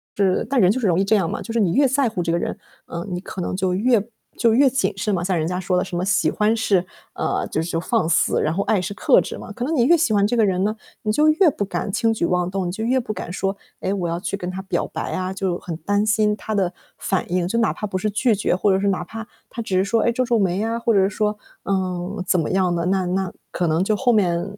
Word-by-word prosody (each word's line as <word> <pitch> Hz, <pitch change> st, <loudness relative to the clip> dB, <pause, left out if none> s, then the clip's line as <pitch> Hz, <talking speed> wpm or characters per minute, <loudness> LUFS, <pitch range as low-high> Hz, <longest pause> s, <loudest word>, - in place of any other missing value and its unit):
就 200 Hz, -, +1 dB
是 185 Hz, -, +1 dB
但 270 Hz, -5 st, +2 dB
人 185 Hz, +1 st, +5 dB
就 260 Hz, -, -1 dB
是 220 Hz, -, 0 dB
容 170 Hz, -1 st, +2 dB
易 -, -, +3 dB
这 215 Hz, +2 st, +3 dB
样 170 Hz, -4 st, 0 dB
嘛， -, -, -4 dB
就 230 Hz, -, -6 dB
是 230 Hz, -, 0 dB
你 180 Hz, -5 st, +2 dB
越 280 Hz, +1 st, +4 dB
在 265 Hz, 0 st, +2 dB
乎 195 Hz, -6 st, -2 dB
这 165 Hz, -, -1 dB
个 170 Hz, -, +1 dB
人， -, -, -3 dB, 0.3 s
嗯， 170 Hz, 0 st, -6 dB
你 175 Hz, -, -2 dB
可 185 Hz, 0 st, -7 dB
能 -, -, -3 dB
就 185 Hz, -1 st, 0 dB
越 220 Hz, +1 st, +2 dB, 0.3 s
就 230 Hz, -2 st, +3 dB
越 270 Hz, +2 st, +5 dB
谨 265 Hz, +2 st, 0 dB
慎 205 Hz, +1 st, -1 dB
嘛。 175 Hz, -, 0 dB
像 185 Hz, -1 st, 0 dB
人 155 Hz, -, 0 dB
家 180 Hz, +1 st, -2 dB
说 185 Hz, -1 st, 0 dB
的 -, -, +2 dB
什 175 Hz, -, -6 dB
么 175 Hz, -, -1 dB
喜 180 Hz, -3 st, +2 dB
欢 215 Hz, +1 st, +2 dB
是， 195 Hz, -5 st, +2 dB, 0.3 s
呃， -, -, -1 dB
就 160 Hz, -, 0 dB
是 165 Hz, -, -4 dB
就 165 Hz, -, -1 dB
是 -, -, -13 dB
放 160 Hz, -, +1 dB
肆， 160 Hz, -, +2 dB
然 155 Hz, -, +1 dB
后 200 Hz, +3 st, 0 dB
爱 205 Hz, -4 st, +1 dB
是 190 Hz, +3 st, -4 dB
克 290 Hz, +2 st, +4 dB
制 -, -, -6 dB
嘛。 215 Hz, -, -9 dB
可 240 Hz, +3 st, -5 dB
能 320 Hz, +2 st, -1 dB
你 240 Hz, -, +3 dB
越 340 Hz, +7 st, +5 dB
喜 300 Hz, -8 st, +1 dB
欢 200 Hz, -1 st, +3 dB
这 240 Hz, -, 0 dB
个 225 Hz, -, +3 dB
人 190 Hz, -1 st, +1 dB
呢， 215 Hz, +2 st, 0 dB, 0.3 s
你 215 Hz, -, 0 dB
就 300 Hz, +7 st, +3 dB
越 330 Hz, +3 st, +4 dB
不 205 Hz, -, -3 dB
敢 195 Hz, -, -3 dB
轻 225 Hz, +3 st, +1 dB
举 175 Hz, -, -1 dB
妄 180 Hz, 0 st, 0 dB
动， 190 Hz, -1 st, -2 dB
你 -, -, -2 dB
就 220 Hz, +4 st, -4 dB
越 255 Hz, +3 st, +2 dB
不 215 Hz, -3 st, -4 dB
敢 175 Hz, -, -6 dB
说， 195 Hz, +2 st, -2 dB, 0.3 s
诶， 190 Hz, -, -1 dB
我 180 Hz, -4 st, -2 dB
要 170 Hz, +1 st, -2 dB
去 200 Hz, -, -3 dB
跟 180 Hz, -2 st, -5 dB
他 185 Hz, +1 st, -5 dB
表 185 Hz, -3 st, -2 dB
白 -, -, -5 dB
啊， 185 Hz, 0 st, -2 dB
就 190 Hz, -2 st, -2 dB
很 170 Hz, -3 st, -6 dB
担 205 Hz, +5 st, 0 dB
心 210 Hz, 0 st, +2 dB
他 220 Hz, -, -5 dB
的 185 Hz, -3 st, +1 dB, 0.3 s
反 190 Hz, -2 st, -2 dB
应。 180 Hz, -1 st, +1 dB
就 230 Hz, +5 st, 0 dB
哪 225 Hz, -, +2 dB
怕 210 Hz, -, -5 dB
不 195 Hz, -, -6 dB
是 215 Hz, +3 st, -1 dB
拒 225 Hz, +3 st, +2 dB
绝， 195 Hz, -2 st, 0 dB
或 195 Hz, +1 st, +2 dB
者 190 Hz, -, +2 dB
是 200 Hz, -, +1 dB
哪 195 Hz, -, 0 dB
怕 225 Hz, 0 st, -8 dB, 0.3 s
他 235 Hz, -, -5 dB
只 190 Hz, -4 st, -1 dB
是 190 Hz, -, +2 dB
说， 230 Hz, +2 st, +1 dB
哎， 235 Hz, -, +2 dB
皱 255 Hz, +1 st, 0 dB
皱 235 Hz, -2 st, +2 dB
眉 195 Hz, +1 st, +1 dB
啊， 230 Hz, +1 st, -1 dB
或 230 Hz, -1 st, +1 dB
者 190 Hz, 0 st, +4 dB
说， 210 Hz, +1 st, -1 dB, 0.3 s
嗯， 185 Hz, 0 st, -2 dB
怎 185 Hz, -, +3 dB
么 155 Hz, -, -1 dB
样 185 Hz, -2 st, +1 dB
的， 170 Hz, 0 st, -1 dB
那 190 Hz, -1 st, +1 dB
那 185 Hz, 0 st, -1 dB, 0.2 s
可 175 Hz, -, -1 dB
能 160 Hz, +3 st, +2 dB
就 215 Hz, +1 st, +1 dB
后 245 Hz, +2 st, +2 dB
面 175 Hz, -5 st, +2 dB
195 Hz, 325 characters per minute, -22 LUFS, 180-220 Hz, 0.3 s, 人